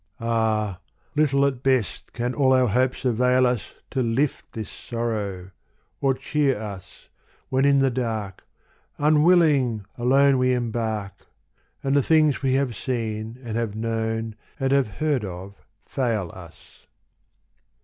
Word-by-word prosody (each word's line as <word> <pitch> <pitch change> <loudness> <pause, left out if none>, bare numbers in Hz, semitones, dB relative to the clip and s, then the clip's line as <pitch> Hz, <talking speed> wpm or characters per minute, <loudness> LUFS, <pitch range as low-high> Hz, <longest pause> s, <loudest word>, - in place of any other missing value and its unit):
Ah! 110 -4 0 0.4
little 140 -2 +3
at 130 -3 -1
best 130 -7 0
can 120 +1 -2
all 130 -2 +3
our 130 -1 +4
hopes 125 +4 0
avail 125 +1 +3
us 125 -7 -2 0.2
To 130 - 0
lift 125 +4 -1
this 110 -2 -5
sorrow, 105 -6 -4 0.5
or 135 -1 +2
cheer 135 -2 0
us, 100 -4 -9 0.4
when 130 +1 +2
in 140 0 +5
the 135 -1 +3
dark. 110 -6 -3 0.5
Unwilling, 150 - +3
alone 135 +2 +4
we 125 0 +3
embark, 110 -5 -3 0.6
And 135 +1 +1
the 140 - +5
things 155 0 +3
we 130 -1 +2
have 135 -4 0
seen 115 -2 -3
and 115 -2 -5
have 115 -3 -2
known 110 0 -2 0.2
and 135 -1 0
have 140 -3 +3
heard 150 -6 0
of, 95 +1 -7 0.3
fail 115 - -1
us. 85 -3 -15
120 Hz, 135 wpm, -24 LUFS, 110-135 Hz, 0.6 s, in